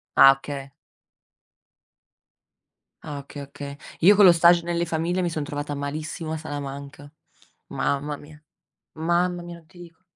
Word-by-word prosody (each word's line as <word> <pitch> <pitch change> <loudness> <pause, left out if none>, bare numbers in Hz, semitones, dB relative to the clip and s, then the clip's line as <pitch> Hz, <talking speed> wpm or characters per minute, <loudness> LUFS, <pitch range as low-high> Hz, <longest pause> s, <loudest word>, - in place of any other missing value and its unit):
Ah, 135 - +9
oka 135 0 -7 2.3
Ah, 145 -1 -6
oka 140 +1 -9
oka 140 0 -8 0.3
Io 200 +5 +7
con 205 - +7
lo 180 - +10
stage 170 0 +5
nelle 170 0 -1
famiglie 170 +3 -1
mi 175 - 0
son 155 -2 -3
trovata 145 0 -4
malissimo 155 +3 -5
a 160 - -2
Salamanca. 145 -1 -7 0.6
Mamma 145 +1 -2
mia, 150 +1 -15 0.5
mamma 175 +2 0
mia, 175 0 -8
non 165 -2 -18
ti 175 - -19
dico. 170 0 -14
155 Hz, 140 wpm, -24 LUFS, 145-170 Hz, 2.3 s, lo